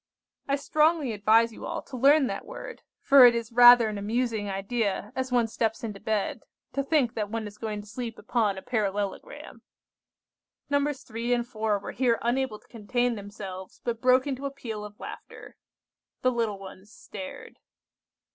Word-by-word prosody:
I 275 - +2
strongly 300 -1 +2
advise 220 +2 +3
you - - -8
all - - -4
to 265 - -10
learn 280 +3 +5
that - - -4
word, - - -8 0.2
for 275 -2 +8
it 240 - +3
is 230 0 -3
rather 240 -1 +8
an 210 -1 -4
amusing 220 0 -1
idea 200 +2 -2
as 260 -1 -3
one 240 -2 +3
steps 225 0 -2
into 210 -3 -5
bed, 215 -2 -2 0.3
to 275 - 0
think 275 -5 +1
that 210 -3 -3
one 225 0 -3
is 210 0 -10
going 215 -2 -4
to 205 - -15
sleep 230 +1 -6
upon 210 -3 0
a 190 - -8
parallelogram." 205 - -3 1.1
Nos. 285 0 0
3 235 +2 -1
and 240 0 -2
4 215 -3 -1
were 200 - -7
here 240 -2 +1
unable 240 -1 0
to - - -27
contain 245 +2 -1
themselves, 200 -3 -8
but 230 -2 -3
broke 255 0 +4
into 280 0 -3
a - - -3
peal 225 -6 -6
of 210 0 -11
laughter. - - -10 0.7
The 255 - +4
little 230 -4 -1
ones 195 +1 -12
stared. 280 +4 -10
230 Hz, 175 wpm, -27 LUFS, 210-255 Hz, 1.1 s, for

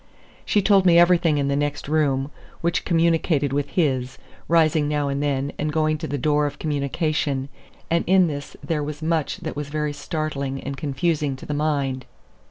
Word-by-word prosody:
She 205 - +2
told 195 -1 +5
me 170 -1 +6
everything 170 -3 +4
in 140 -1 0
the 140 - +1
next 145 0 -2
room, 145 -2 +1 0.3
which 170 +1 0
communicated 165 -4 +2
with 145 0 -1
his, 130 -7 0 0.3
rising 160 -2 +3
now 145 -1 0
and 140 +1 -2
then 140 -1 -1
and 150 +1 -1
going 155 0 +1
to - - -4
the 145 - -2
door 150 +1 +2
of 145 - -7
communication; 145 -2 -1 0.4
and 170 0 +2
in 185 0 +5
this 145 -3 -5
there 160 -3 -1
was 150 +1 -6
much 160 -2 0
that 160 -3 -5
was 145 -1 -5
very 150 0 -2
startling 145 -2 -3
and 140 - -4
confusing 145 +1 -1
to 130 - -11
the 150 - -3
mind. 140 -4 -1
150 Hz, 180 wpm, -23 LUFS, 140-160 Hz, 0.4 s, me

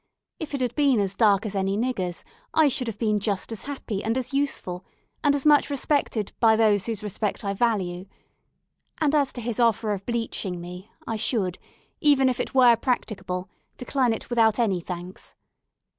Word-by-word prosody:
If 300 -3 -4
it 275 - -3
had 245 -2 0
been 275 -5 +3
as 195 -1 0
dark 205 -1 +3
as 210 - -3
any 195 0 0
nigger's, 200 -8 -2 0.3
I 315 -2 +5
should 250 -1 -1
have 225 - -4
been 215 -2 +1
just 200 0 -2
as 225 - -7
happy 250 -8 -4
and 225 +3 0
as 255 0 -4
useful, 275 -10 -2 0.4
and 290 -1 +4
as 285 - -3
much 295 -1 +5
respected 280 -6 0
by 225 -2 +5
those 215 -2 +3
whose 225 -2 -4
respect 210 +1 -3
I 200 - 0
value; 195 -5 -1 0.9
and 305 -2 +2
as 285 -3 +2
to 245 - -6
his 235 0 -3
offer 225 -2 +2
of 195 -1 -5
bleaching 225 -6 -3
me, 180 +4 -9 0.2
I 225 - -3
should, 205 -5 -1 0.4
even 275 -3 +4
if 250 - -2
it - - -3
were 245 -3 +7
practicable, 190 -8 -2 0.3
decline 255 -1 0
it 225 - -4
without 225 -2 +3
any 210 -7 +1
thanks. 180 +1 -8
225 Hz, 185 wpm, -25 LUFS, 195-255 Hz, 0.9 s, were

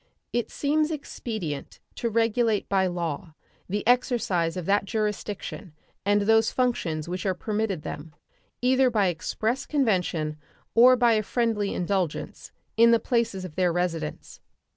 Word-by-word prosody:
It 240 -1 0
seems 305 +2 +1
expedient 220 - -5 0.2
to 235 - -1
regulate 225 -1 +1
by 190 -1 +2
law 170 -2 -4 0.3
the 205 +2 -2
exercise 210 -9 +1
of 180 - -4
that 200 +2 +2
jurisdiction 210 -4 -4 0.3
and 205 +1 +2
those 225 +2 +4
functions 175 -12 -1
which 180 +1 -4
are 190 -2 0
permitted 210 -6 -2
them, 150 +1 -7 0.5
either 260 +1 +4
by 210 -5 +2
express 215 - -2
convention 180 - 0 0.4
or 250 +2 +7
by 240 -2 +4
a 215 - +2
friendly 220 -2 -1
indulgence, 180 -3 -2 0.3
in 230 +1 +7
the 230 -1 +5
places 230 -7 -1
of 175 - -8
their 180 +1 +2
residence. 165 -3 -3
205 Hz, 140 wpm, -26 LUFS, 180-235 Hz, 0.5 s, or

